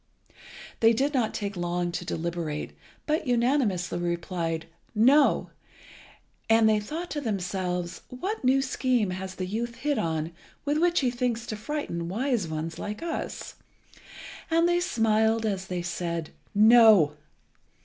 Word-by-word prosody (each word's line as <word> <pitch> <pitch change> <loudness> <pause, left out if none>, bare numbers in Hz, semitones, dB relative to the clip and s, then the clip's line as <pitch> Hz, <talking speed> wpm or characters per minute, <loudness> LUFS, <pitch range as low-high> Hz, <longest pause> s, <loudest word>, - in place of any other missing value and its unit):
They 225 0 +5
did 275 +6 0
not 245 -5 +1
take 200 -1 -4
long 175 0 -1
to 170 - -4
deliberate, 165 -3 -4 0.3
but 305 -1 0
unanimously 235 -8 +1
replied 170 -1 -2 0.3
"No"; 270 +7 +4 1.0
and 225 0 +5
they 215 -1 +4
thought 320 +12 -5
to 295 - -2
themselves, 180 -5 -2
"What 375 - -4
new 265 +1 +3
scheme 250 -6 0
has 185 0 -5
the 185 - -3
youth 230 +5 -3
hit 290 +2 -1
on 160 0 -1 0.3
with 295 +1 +1
which 345 0 +3
he 255 -2 +1
thinks 240 -2 -1
to 215 - -4
frighten 210 - -4
wise 235 -1 0
ones 160 +1 -4
like 210 +8 -5
us?" 335 -1 -5 0.9
and 330 +1 +3
they 350 0 +2
smiled 225 -6 +2
as 190 -3 -2
they 180 -2 -3
said 170 -2 -3 0.2
"No." 215 -7 +7
215 Hz, 140 wpm, -27 LUFS, 175-255 Hz, 1.0 s, No